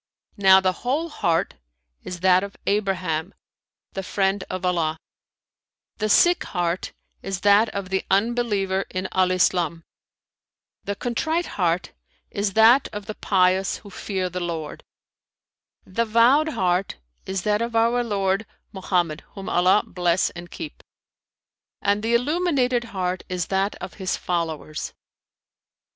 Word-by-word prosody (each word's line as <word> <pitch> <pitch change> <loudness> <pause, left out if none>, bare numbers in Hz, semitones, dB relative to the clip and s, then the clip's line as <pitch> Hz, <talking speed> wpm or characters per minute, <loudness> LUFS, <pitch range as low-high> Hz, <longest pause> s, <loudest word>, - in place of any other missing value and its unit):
Now 190 -1 +7
the 190 -1 +2
whole 295 +7 -1
heart 165 - 0 0.5
is 180 -1 -7
that 185 0 +5
of 200 0 -7
Abraham, 185 -4 -1 0.6
the 195 - -3
Friend 195 0 0
of 185 0 -4
Allah; 165 -3 0 1.0
the 215 0 -1
sick 350 +11 +5
heart 175 -1 -2 0.3
is 195 -1 -4
that 205 +2 +5
of 200 -3 -5
the 190 0 0
Unbeliever 200 -2 +1
in 185 0 -3
Al 185 -1 +2
Islam; 175 -2 +1 1.0
the 200 - -3
contrite 315 - -1
heart 175 -2 0 0.4
is 200 -1 -1
that 230 +6 +6
of 205 -1 -6
the 215 - -5
pious 190 -1 +2
who 200 - -11
fear 190 -1 -3
the 180 0 -4
Lord; 165 -3 -5 1.0
the 230 +5 -1
vowed 240 +8 +4
heart 185 - 0 0.3
is 190 -1 -2
that 210 +1 +1
of 235 0 -3
our 235 +2 +3
Lord 200 -2 0 0.2
Mohammed 180 -5 -1
(whom 195 -1 -7
Allah 185 +4 +4
bless 175 0 +1
and 175 0 -10
keep!) 315 -2 -8 1.0
and 205 +1 +1
the 230 +2 +1
illuminated 260 -3 +1
heart 185 -5 -3
is 180 -2 -2
that 195 +2 +1
of - - -8
his 185 -2 -1
followers. 160 -3 -3
195 Hz, 135 wpm, -23 LUFS, 180-220 Hz, 1.0 s, Now